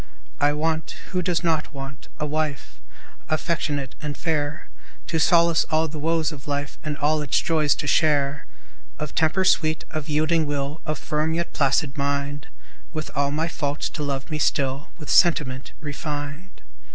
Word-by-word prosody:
I 145 0 +4
want 160 +1 -1 0.2
(who 180 -1 +1
does 180 0 0
not 160 -3 0
want?) 135 +1 -7
a 150 - 0
wife, 150 -1 -2 0.5
Affectionate 150 -4 -1
and 150 -1 -4
fair; 155 -2 -1 0.4
To 165 - 0
solace 170 0 +5
all 160 +1 +3
the 155 0 -6
woes 165 +1 +1
of 145 -1 -10
life, 145 -1 -3
And 150 -1 -3
all 150 +1 +2
its 145 - +2
joys 155 -3 +2
to - - -4
share. 145 -2 +2 0.5
Of 150 -1 -4
temper 170 +4 +2
sweet, 155 -3 +3
of 155 0 -4
yielding 155 +1 +2
will, 145 +2 -2
Of 155 -1 -1
firm, 155 +3 0
yet 170 0 -2
placid 140 0 +2
mind, 140 +1 -1 0.5
With 155 -1 -4
all 140 0 +2
my 155 +3 0
faults 145 -3 -2
to 155 - -6
love 140 0 -3
me 155 - -1
still 140 -1 +1
With 155 -4 -5
sentiment 140 -7 +3
refined. 145 +3 -5
150 Hz, 165 wpm, -24 LUFS, 145-160 Hz, 0.5 s, solace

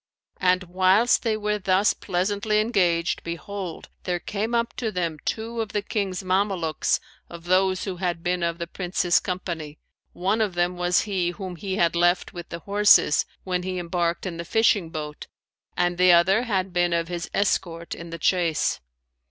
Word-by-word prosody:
And 185 0 +3
whilst 185 +6 +3
they 220 -3 0
were 210 0 -1
thus 190 +2 +3
pleasantly 205 +3 0
engaged, 180 -7 +1
behold, 175 +1 -6
there 180 -1 -1
came 215 +6 -2
up 235 0 0
to 225 -3 -2
them 170 -5 -2
two 230 +1 -2
of 220 - -5
the 205 - -1
King's 195 -3 -2
Mamelukes 185 -4 0 0.3
of 170 -1 -10
those 185 +1 +2
who 190 -3 -4
had 175 -2 -2
been 180 0 0
of 170 0 -1
the 170 - -4
Prince's 180 0 +1
company, 170 -5 -5 0.4
one 195 +5 0
of 205 -5 0
them 175 +1 +1
was 175 0 +2
he 190 -4 -1
whom 185 0 -6
he 190 +3 -4
had 170 -3 +2
left 175 +1 +2
with 175 -1 -8
the 170 - -6
horses, 205 -6 +4 0.2
when 180 -1 -1
he 185 0 -4
embarked 175 0 -1
in 175 -3 -4
the 170 - -4
fishing 205 -2 +2
boat 150 -2 -6 0.5
and 175 0 +1
the 180 0 +6
other 185 +5 +5
had 190 -5 -1
been 175 -1 +2
of 170 0 0
his 175 -1 -5
escort 170 -4 -1
in 170 0 -8
the 165 - -6
chase. 170 -1 +1
180 Hz, 175 wpm, -24 LUFS, 170-200 Hz, 0.5 s, the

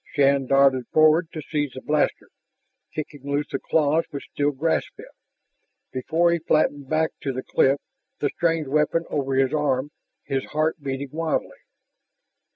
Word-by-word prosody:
Shann 140 -2 +3
darted 135 -2 +4
forward 155 +2 +4
to 155 -3 -6
seize 145 -3 -2
the 130 - -8
blaster, 150 0 0 0.6
kicking 150 -2 -5
loose 145 +1 -2
the - - -1
claws 155 +1 +2
which 140 - -8
still 145 0 +1
grasped 150 +3 -1
it, - - -12 0.8
before 160 +6 +1
he 170 - +1
flattened 145 -3 +1
back 160 0 +1
to 140 - -2
the 130 0 -5
cliff, 135 +1 +3 0.4
the 145 - 0
strange 165 -2 0
weapon 150 +4 +1
over 135 -2 -1
his 135 +1 +2
arm, 145 -2 0 0.3
his 135 -2 -2
heart 155 +1 -1
beating 135 0 -4
wildly. 160 0 -2
145 Hz, 155 wpm, -24 LUFS, 135-155 Hz, 0.8 s, darted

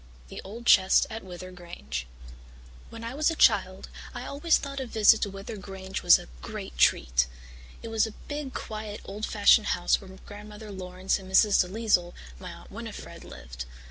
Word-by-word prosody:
The - - -7
Old 230 +5 -9
Chest 190 -4 +6
at 220 +1 -6
Wyther 185 0 -9
Grange 70 - -7 0.8
When 230 0 -9
I 230 +2 -5
was 300 +3 +2
a 330 - -2
child 190 -8 +3 0.3
I 245 +1 -5
always 300 +4 +2
thought 275 -1 -6
a 265 - -4
visit 220 -1 +5
to 205 - 0
Wyther 195 +3 -8
Grange 190 0 -6
was - - +7
a - - -11
great - - -7
treat. - - +3 0.6
It 230 - -6
was 225 0 +2
a 220 - -9
big, 290 -2 -5
quiet, 215 -1 -6
old 210 +2 -5
fashioned 210 +1 +5
house 175 - +2
where 195 - -12 0.2
Grandmother 210 +1 -10
Laurance 185 0 -2
and 190 0 -11
Mrs. 205 +1 +5
DeLisle, 185 -2 0 0.3
my - - -8
Aunt - - -13
Winnifred, - - -8
lived. - - -9
205 Hz, 175 wpm, -27 LUFS, 185-225 Hz, 0.8 s, was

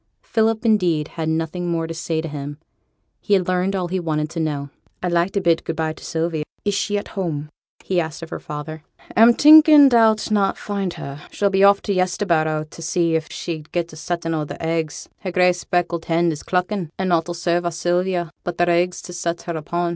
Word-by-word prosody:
Philip, 225 +1 0
indeed, 175 -9 +2
had 160 -1 -3
nothing 165 +2 -2
more 165 -1 -1
to 165 - -5
say 160 -1 -2
to 165 - -5
him: 145 -1 -6 0.6
he 205 - +2
had 185 -2 0
learned 185 +2 0
all 180 -2 -1
he 185 +2 -2
wanted 155 -2 -2
to 165 - -4
know. 145 -3 -2 0.3
'I'd 180 - 0
like 170 +2 +2
to 200 - 0
bid 170 -2 +2
good 165 - -4
by 160 -1 -1
to - - -15
Sylvie. 160 -1 -2 0.2
Is 205 - +1
she 205 +1 0
at 205 - -5
home?' 155 -7 -3 0.3
he 180 -2 +1
asked 160 0 -6
of 165 - -9
her - - -4
father. 150 +1 -7 0.3
'A'm 230 +2 +7
thinking 300 -1 +8
thou'll 225 -2 +5 0.2
not 200 -2 +2
find 200 -3 -3
her. 140 +1 -8
She'll 200 -1 0
be 195 0 +3
off 200 0 +5
to 200 - -1
Yesterbarrow 170 -4 +1
t' 155 +2 -13
see 170 0 0
if 160 -1 -2
she'd 160 -3 -6
get 170 -2 -2
a - - -9
settin' 165 +1 -3
o' 155 -1 -1
their 150 - -7
eggs; 160 -2 -3
her 185 - -4
grey 180 0 +4
speckled 175 -1 -2
hen 170 0 +2
is 150 - -6
cluckin', 180 -1 -1
and 190 -1 -1
nought 170 -1 +1
'll 175 - -3
serve 175 0 0
our 175 - -1
Sylvia 175 0 -1
but 175 -1 -4
their 175 0 +3
eggs 175 +1 +1
to 180 - -9
set 170 -1 -3
her 170 - -4
upon. 170 +3 -2
170 Hz, 225 wpm, -21 LUFS, 160-185 Hz, 0.6 s, thinking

